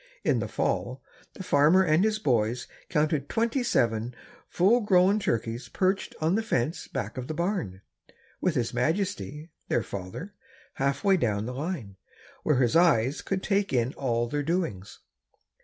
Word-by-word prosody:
In - - +2
the - - -2
fall, - - -2 0.3
the 190 - -7
farmer 155 +4 +4
and 160 +1 +3
his 215 0 +2
boys 125 - 0 0.2
counted 150 -2 0
twenty 230 +4 0
seven 120 - 0 0.4
well 205 +7 +5
grown 195 -1 +4
turkeys 120 - -2
perched 190 +1 0
on 160 +2 +1
the 220 - +2
fence 155 - -1
back 110 +5 -4
of 125 - -6
the 155 - -4
barn, 170 - -2 0.6
with 180 -3 +1
his 120 -3 -1
majesty, 165 -3 -2 0.2
their 120 - +1
father, 100 - -7 0.5
half 140 +1 0
way 195 -1 +4
down 105 - 0
the 125 - -4
line, 135 - -5 0.4
where 150 - +2
his 125 0 +2
eyes 150 -6 +3
could 190 -1 -3
take 200 0 +1
in 125 0 +1
all 120 -3 -1
their 145 +4 -2
doings. 155 - -3
150 Hz, 155 wpm, -27 LUFS, 120-185 Hz, 0.6 s, well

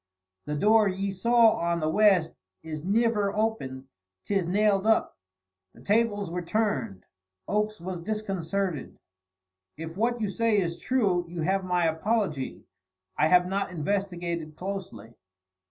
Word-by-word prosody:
"The 150 - -3
door 215 +6 +4
ye 195 +1 -2
saw 230 +4 +4
on 170 0 0
the 155 - -1
west 185 -1 +3 0.3
is 155 -2 -6
niver 210 +1 +2
opened 175 -13 -2 0.4
'tis 195 -4 0
nailed 205 +2 +2
up." 220 - +2 0.6
The - - -16
tables 205 -3 +1
were 180 +1 -2
turned. 155 - -2 0.4
Oakes 210 0 -1
was 180 0 -5
disconcerted. 195 -5 -3 0.8
"If 165 +2 -7
what 235 +3 +1
you 215 - 0
say 225 +2 +1
is 170 -3 -1
true, 195 -9 +1
you 170 -2 -4
have 190 +3 +1
my 180 -2 +1
apology. 160 - -1 0.5
I 155 - +3
have 180 +1 +5
not 195 +1 -1
investigated 170 -2 -3
closely." 180 - -6
190 Hz, 135 wpm, -27 LUFS, 165-210 Hz, 0.8 s, have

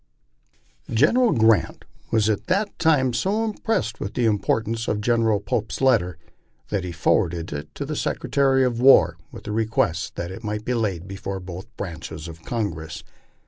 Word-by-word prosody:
General 220 - +4
Grant 110 -7 +2 0.2
was 110 -2 +2
at 110 -2 -1
that 200 +3 0
time 135 -6 +3
so 200 - 0
impressed 215 - -2
with 100 - -5
the 120 - +1
importance 110 +1 0
of 105 - 0
Gen 115 +2 +2
eral 105 -3 +1
Pope's 105 +2 -2
letter 110 -11 +2 0.5
that 100 -3 -1
he 90 - -4
forwarded 85 0 0
it 75 +1 -6
to 140 - -4
the 155 +2 -4
Secretary 135 -2 +1
of 120 -1 -1
War, 85 -11 +6
with - - -10
the 105 - -5
re 110 +1 0
quest 85 -7 0
that 85 +1 -4
it 95 +5 -9
might 105 0 -3
be 125 - 0
laid 100 -7 -1
before 95 0 -5
both 90 +2 -8
branches 85 -3 -6
of 80 0 -10
Congress. 80 -9 -4
110 Hz, 175 wpm, -23 LUFS, 90-125 Hz, 0.5 s, War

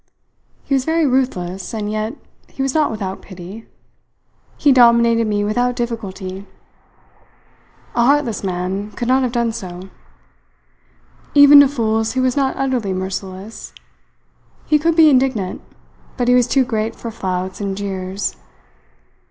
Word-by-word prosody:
He - - -3
was 265 -2 +2
very 320 +2 +1
ruthless, 195 -8 -1
and 210 -1 -3
yet 215 +4 -3 0.3
he 270 - -5
was 270 -1 -1
not 310 -2 +2
without 195 -4 -5
pity. 190 +4 -11 0.9
He 290 - +4
dominated 235 -2 +5
me 205 -1 0
without 245 +4 0
difficulty. 200 -5 -5 1.5
A 235 - +2
heartless 270 -4 +1
man 190 +2 -3
could 240 - -4
not 260 +1 +3
have 250 -2 0
done 235 -1 0
so. 185 -3 -8 1.5
Even 285 0 +9
to 285 - +7
fools 225 -4 -1
he 260 - -1
was 255 -1 +1
not 275 -2 0
utterly 255 -8 -1
merciless. 190 +2 -6 0.9
He 300 - +3
could 330 +2 +1
be 325 -1 +7
indignant, 255 -9 +1 0.6
but 245 -2 -1
he 250 - +5
was 250 -1 +4
too 270 -2 +2
great 225 -1 -2
for 230 - -7
flouts 185 -2 -4
and 195 -1 -3
jeers. 195 -1 -4
230 Hz, 140 wpm, -19 LUFS, 195-260 Hz, 1.5 s, Even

